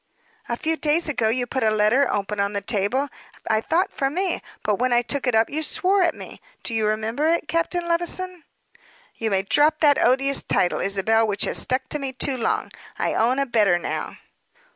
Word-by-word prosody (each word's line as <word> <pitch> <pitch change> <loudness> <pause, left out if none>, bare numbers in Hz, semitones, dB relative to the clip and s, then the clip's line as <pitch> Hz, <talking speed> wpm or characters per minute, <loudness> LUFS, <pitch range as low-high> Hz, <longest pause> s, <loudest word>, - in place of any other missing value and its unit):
"A 235 - -1
few 320 +4 -1
days 315 +3 +1
ago 230 -7 0
you 245 +2 0
put 260 +2 -3
a 220 - +3
letter, 215 +6 +2
open 205 0 -2
on 200 +1 0
the 200 - -2
table, 210 +7 0 0.4
I 220 -1 +2
thought 350 - 0
for 270 - 0
me; 360 +4 -2 0.2
but 210 -1 0
when 255 +1 +1
I 240 0 +3
took 275 +2 -2
it 245 - +2
up 220 0 +4
you 310 +2 -3
swore 380 +5 +2
at 340 -2 +2
me. - - -11 0.2
Do 230 - -2
you 220 -1 +1
remember 220 +7 -1
it 330 -1 +1
Captain 335 +2 -1
Levison?" 345 +1 -2 0.7
"You 225 - -2
may 195 -2 +1
drop 300 +9 +3
that 290 -2 +4
odious 270 +2 +2
title, 175 - 0
Isabel, 220 +3 +2
which 200 -1 -1
has - - +1
stuck 255 0 -1
to 300 - -2
me 270 -2 -4
too 270 +1 0
long. 230 - -1 0.3
I - - -1
own 245 +4 +2
a 275 - +1
better, 210 -8 +3
now." 175 - -4
255 Hz, 205 wpm, -23 LUFS, 220-310 Hz, 0.7 s, up